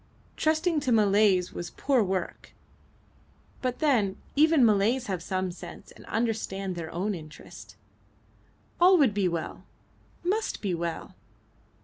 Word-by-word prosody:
Trusting 315 +1 +1
to 260 -3 -1
Malays 205 -4 +3
was 175 - -5
poor 270 -4 +1
work; 190 -2 -4 1.1
but 250 -1 -2
then 225 -11 +1 0.2
even 305 -2 +5
Malays 220 +4 +2
have 190 -5 -3
some 185 +1 -2
sense 175 - -11
and - - -16
understand 205 -4 -2
their 165 -2 -5
own 195 +5 -2
interest. 155 -4 -11 1.0
All 365 +2 +7
would 270 -9 +4
be 200 -2 +1
well 170 -2 -4 0.6
must 415 +5 -1
be 195 -4 -2
well. 170 -1 -4
205 Hz, 125 wpm, -27 LUFS, 185-265 Hz, 1.1 s, All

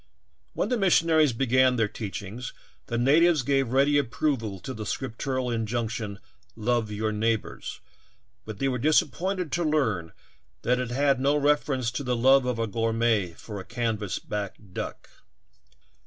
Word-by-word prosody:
When - - -1
the 250 -2 +1
missionaries 165 -6 +4
began 130 +1 +3
their 110 -3 +2
teachings 105 +3 -6 0.3
the 120 - -2
natives 150 +4 +4
gave 135 0 +2
ready 140 +2 +4
approval 115 -6 -1
to 130 - -5
the 110 -3 -6
scriptural 130 +2 -3
injunction 115 -2 -2 0.4
''love 115 0 0
your 105 +1 -1
enemies," 110 +1 -2 0.6
but 110 -2 -7
they 135 - 0
were 125 -2 -1
disappointed 170 +5 +1
to 175 - 0
learn 115 - 0 0.5
that 125 +1 +2
it 125 -2 -2
had 135 +1 +2
no 140 +2 +2
reference 145 -4 +1
to 140 - -4
the 125 -1 0
love 130 +2 +5
of 125 -2 -1
a 115 - 0
gourmet 115 -4 0
for 105 +4 -8
a - - -6
canvas 115 -5 -2
back 105 -2 -4 0.2
duck. - - -5
125 Hz, 150 wpm, -26 LUFS, 110-140 Hz, 0.6 s, love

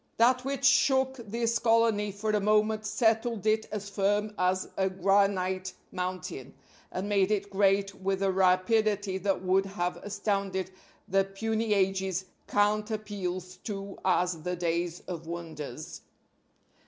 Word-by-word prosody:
That 250 +2 +4
which 275 0 -2
shook 265 -1 +4
this 230 0 -1
colony 225 -3 +3
for 210 +2 -2
a 210 - +2
moment 215 +1 +2
settled 220 0 +1
it 220 0 +2
as 205 -1 -4
firm 205 +1 0
as 185 0 +1
a 190 0 +1
granite 190 -1 +1 0.2
mountain 185 0 -5 0.4
and 185 +2 -3
made 200 -2 +2
it 200 -1 -1
great 195 0 +2
with 195 0 -2
a 195 - +3
rapidity 190 +1 +2
that 195 0 0
would 190 +1 +2
have 180 -2 -2
astounded 195 -2 -2 0.4
the 195 +1 +3
puny 220 +2 -1
ages 190 -1 0 0.2
cant 210 +1 +2
appeals 185 -4 -4
to 200 -2 -5
as 180 -3 +1
the 180 +3 -2
days 170 0 -1
of 165 -3 -7
wonders. 155 -4 -7
195 Hz, 135 wpm, -29 LUFS, 185-215 Hz, 0.4 s, That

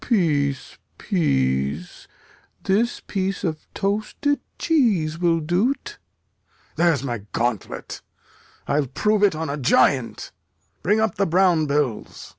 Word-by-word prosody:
Peace, 145 - 0 0.2
peace; 70 - -1 0.6
this 220 +5 +1
piece 195 0 -3
of 155 -4 -4
toasted 215 +8 -1 0.2
cheese 200 - +1
will 170 -2 +2
do't. 225 - -1 0.8
There's 165 -6 +2
my 120 -4 -3
gauntlet; 120 -4 -3 0.7
I'll 145 -1 +1
prove 210 - +1
it 200 -5 +4
on 160 +1 -3
a 145 0 -3
giant. 130 -2 +2 0.5
Bring 210 +6 +2
up 220 -4 0
the 200 - +2
brown 175 -2 +3
bills. 140 -6 -2
165 Hz, 110 wpm, -23 LUFS, 140-200 Hz, 0.8 s, it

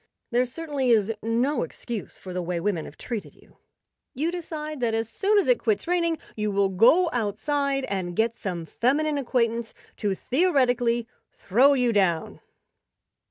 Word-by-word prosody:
There 245 +1 +3
certainly 280 -1 -3
is 225 -2 +3
no 240 +6 +1
excuse 235 -4 -6
for 185 - -9
the 180 - -2
way 175 0 -2
women 170 -3 -1
have - - -12
treated 230 -4 -6
you. - - -23 0.6
You 310 +6 0
decide 310 -4 -5
that 230 -2 0
as 225 0 -1
soon 400 - +1
as 405 - +3
it - - +4
quits 430 -2 0
raining 340 -2 +1 0.2
you 210 -1 -1
will 200 -1 +2
go 270 - +4
outside 275 +5 -1
and 185 -6 -3
get 225 +2 +1
some 180 -7 -4
feminine 290 - +1
acquaintance 235 -3 -1 0.2
to 205 -3 -1
theoretically 245 - +1 0.2
"throw 255 +9 +3
you 250 -3 +2
down." 175 -6 +1
240 Hz, 160 wpm, -25 LUFS, 210-290 Hz, 0.6 s, it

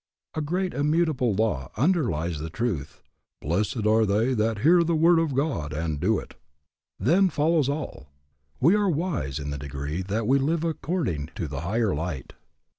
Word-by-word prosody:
A 155 - -2
great 180 +5 -1
immutable 150 - +1
law 100 - 0
underlies 110 - +1
the 80 +2 -5
truth, 80 - -3 0.4
Blessed 105 - -1
are 110 +1 +4
they 110 +5 +2
that 110 -2 0
hear 170 +4 +5
the 170 0 +1
word 165 +2 +5
of 160 -5 0
God 130 - -1
and 80 -1 -2
do 105 +6 +2
it. - - -8 0.6
Then 180 - +3
follows 155 -2 +2
all. 145 - -4 0.5
We 160 +8 +5
are 205 -1 +2
wise 150 - -2
in 70 -1 -4
the 70 - -4
degree 70 +4 -4
that 105 +4 -2
we 135 +4 +3
live 155 +4 0
according 155 - -2
to 90 -7 -3
the 70 0 -5
higher 105 +4 0
light. 80 -3 -4
115 Hz, 170 wpm, -26 LUFS, -, 0.6 s, hear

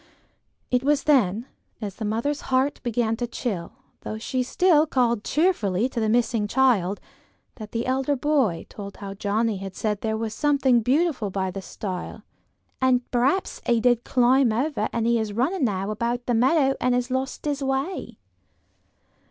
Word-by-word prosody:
It 250 -1 +3
was 290 0 +2
then, 235 -7 +2 0.3
as 205 -4 -6
the 220 - -4
mother's 235 +8 -1
heart 260 +2 +1
began 235 -2 0
to 240 0 -2
chill, 210 -7 -4 0.3
though 215 - -6
she 255 +3 -2
still 320 +4 +3
called 235 -6 +1
cheerfully 245 - +1
to 245 - -4
the 220 -1 +1
missing 230 -2 +1
child, 205 -6 +2 0.6
that 215 -3 -9
the 230 +1 -2
elder 265 +2 0
boy 265 - +1
told 200 -1 -9
how 195 -1 -7
Johnnie 210 +2 0
had 195 0 -7
said 210 -2 -2
there 220 -1 -1
was 220 -1 -3
something 275 -3 +3
beautiful 265 - +1
by 190 -1 -2
the 195 +1 -6
stile: 185 -1 -6 0.6
"and 255 -1 +2
perhaps 265 +10 0
he 235 -1 +3
did 240 0 +2
climb 255 0 +3
over, 245 -1 -1
and 230 -1 -1
he 235 0 +3
is 215 -2 -3
running 270 - +1
now 195 -2 -1
about 235 +3 -2
the 245 - 0
meadow, 270 +3 +3
and 250 0 +2
has 250 +1 -1
lost 260 +2 -3
his 290 -1 -1
way." 270 +7 -2
240 Hz, 170 wpm, -24 LUFS, 215-265 Hz, 0.6 s, It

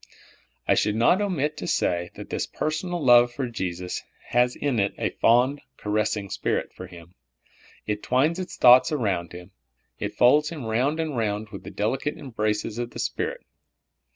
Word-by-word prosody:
I - - +5
should 105 - +1
not 120 - +3
omit 155 -7 -1
to - - -5
say 85 0 0
that - - -10
this - - -2
personal 160 +1 -3
love 120 -1 +6
for 130 +1 -3
Jesus 90 -5 -4 0.3
has 125 +1 +2
in 135 -6 -1
it 100 0 0
a - - -1
fond, 125 +5 +3 0.2
caressing 105 -1 -1
spirit - - -2
for 90 - -9
Him. 85 -1 -14 0.7
It 105 0 -2
twines 150 +8 +1
its 185 -1 -6
thoughts 125 +5 +7
around 100 - -1
Him. 90 0 -11 0.5
It - - -4
folds 150 +5 +4
Him 150 -7 -7
round 130 +8 0
and 160 -3 -2
round 105 -2 -2
with 100 -3 -9
the - - -8
delicate 130 +8 -2
embraces 110 -4 -2
of 120 0 -3
the - - -10
Spirit. - - -3
120 Hz, 170 wpm, -25 LUFS, 105-145 Hz, 0.7 s, thoughts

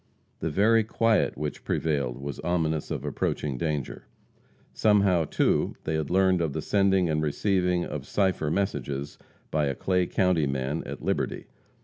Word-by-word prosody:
The - - -2
very 110 +8 +4
quiet 115 0 +1
which 75 0 -4
prevailed 70 -6 -1
was 70 0 -6
ominous 80 -3 -1
of - - -4
approaching 70 -3 -2
danger. 75 +1 -3 0.7
Somehow, 100 -6 +3
too, - - +1
they 80 - -2
had 80 -2 -1
learned 95 -1 +3
of 80 -4 -1
the - - -2
sending 95 -3 +3
and 75 -1 0
receiving 90 +3 +1
of 70 -2 -6
cipher 95 -6 +1
messages 70 -6 -2 0.3
by 75 -2 +1
a 70 - -1
Clay 90 +2 +1
county 90 -5 +2
man, 70 +3 -2
at - - -7
Liberty. - - -1
80 Hz, 150 wpm, -27 LUFS, 75-95 Hz, 0.7 s, very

